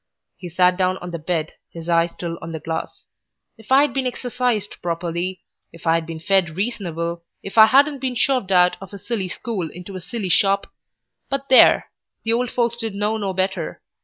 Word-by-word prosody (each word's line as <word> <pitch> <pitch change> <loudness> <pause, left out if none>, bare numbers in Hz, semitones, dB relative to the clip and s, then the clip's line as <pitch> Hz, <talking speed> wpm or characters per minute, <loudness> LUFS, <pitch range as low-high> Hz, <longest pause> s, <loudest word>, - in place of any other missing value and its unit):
He 180 - -8
sat 180 +1 +3
down 185 0 +1
on 180 -1 -7
the 170 - -4
bed, 160 0 -2 0.2
his 165 0 -9
eye 170 0 +3
still 170 0 -6
on 165 0 -7
the 160 - -4
glass. 160 +1 -5 0.5
"If 220 +2 -17
I'd 280 +2 +5
been 265 -1 0
exercised 245 -4 -2
properly, 175 +2 -3 0.3
if 165 - -15
I'd 165 0 +2
been 165 -1 -6
fed 175 -1 +1
reasonable, 170 -6 -3 0.2
if 195 - -7
I 220 -1 +9
hadn't 280 +3 +4
been 255 -1 -2
shoved 250 -5 +1
out 180 -1 +4
of 195 - -10
a - - -6
silly 200 -1 -3
school 185 -3 -4
into 180 +4 -10
a 185 - -5
silly 210 0 -4
shop 195 +2 +2 0.6
But 275 0 -3
there! 260 - +6 0.3
the 225 - +2
old 245 +1 0
folks 235 -1 0
didn't 225 -4 -4
know 210 +2 0
no 200 -3 -2
better. 185 -2 -2
190 Hz, 190 wpm, -21 LUFS, 170-230 Hz, 0.6 s, I